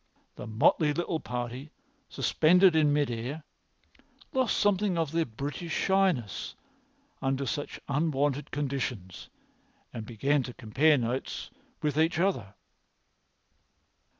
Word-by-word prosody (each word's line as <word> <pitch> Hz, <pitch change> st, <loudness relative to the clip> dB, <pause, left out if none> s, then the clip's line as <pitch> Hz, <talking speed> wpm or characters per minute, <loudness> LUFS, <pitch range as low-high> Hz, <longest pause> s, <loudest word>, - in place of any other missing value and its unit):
The -, -, -8 dB
motley 145 Hz, +7 st, +3 dB
little 170 Hz, -1 st, -1 dB
party, 125 Hz, +3 st, -5 dB, 0.4 s
suspended 180 Hz, +2 st, +4 dB
in 150 Hz, -2 st, +4 dB
mid 145 Hz, -3 st, +1 dB
air, 125 Hz, +7 st, -4 dB, 0.9 s
lost 260 Hz, -3 st, +1 dB
something 205 Hz, -2 st, +2 dB
of 160 Hz, -3 st, 0 dB
their 165 Hz, 0 st, +1 dB
British 145 Hz, +8 st, -5 dB
shyness 135 Hz, -, +1 dB, 0.7 s
under 135 Hz, +1 st, 0 dB
such 145 Hz, +4 st, -4 dB
unwonted 145 Hz, -1 st, 0 dB
conditions 130 Hz, -10 st, -4 dB, 0.6 s
and 115 Hz, -, -5 dB
began 135 Hz, +6 st, +1 dB
to 125 Hz, -1 st, -7 dB
compare 145 Hz, +8 st, +3 dB
notes 125 Hz, +1 st, -3 dB, 0.3 s
with 150 Hz, 0 st, 0 dB
each 160 Hz, +1 st, +2 dB
other. 130 Hz, -, 0 dB
145 Hz, 110 wpm, -29 LUFS, 125-165 Hz, 0.9 s, suspended